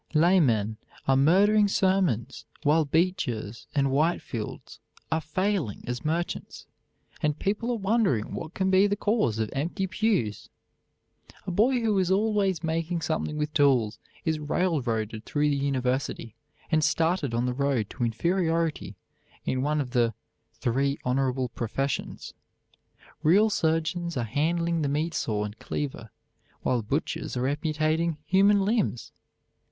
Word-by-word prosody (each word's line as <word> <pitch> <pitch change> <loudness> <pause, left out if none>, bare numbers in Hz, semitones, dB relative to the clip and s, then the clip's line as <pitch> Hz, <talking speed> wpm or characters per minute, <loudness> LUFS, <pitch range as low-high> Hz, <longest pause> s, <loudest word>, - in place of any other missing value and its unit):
Laymen 135 - +3 0.3
are 135 - +4
murdering 200 +9 +5
sermons 185 - +1 0.2
while 155 +2 +3
Beechers 135 - -1
and 140 -1 +2
Whitefields 135 -6 -2 0.3
are 160 0 +1
failing 180 - -1
as 125 0 -4
merchants, 165 +3 -3 0.6
and 150 0 0
people 210 +7 -1
are 240 - 0
wondering 200 - +1
what 160 +2 -6
can 190 0 +1
be 190 +2 +5
the 205 - 0
cause 205 - +1
of 110 -1 -2
empty 165 +7 -1
pews. 185 - -1 1.0
A - - -3
boy 240 +7 +3
who 215 -3 +2
is 185 -2 +1
always 195 -3 +1
making 165 +1 -1
something 155 -1 -2
with 150 0 -2
tools 125 -7 +3 0.3
is 160 -2 0
railroaded 125 - -1
through 150 +3 0
the - - +1
university 130 -4 -1 0.4
and 155 -1 +3
started 160 -4 +1
on 120 +1 +1
the 125 - 0
road 135 -5 0
to - - -4
inferiority 165 - 0 0.5
in 130 - 0
one 150 +2 +1
of 130 -4 -3
the 120 -3 +2 0.4
"three 140 +4 0
honorable 130 0 0
professions." 130 +4 -3 0.9
Real 205 +8 +4
surgeons 165 -1 0
are 120 - 0
handling 165 +7 0
the 145 - 0
meat 155 +4 -1
saw 105 -7 -1
and 105 0 -7
cleaver, 130 -6 -4 0.5
while 125 -2 +1
butchers 130 +3 -3
are 125 +1 0
amputating 155 +2 0
human 195 +1 +4
limbs. 210 - 0
155 Hz, 135 wpm, -27 LUFS, 125-180 Hz, 1.0 s, murdering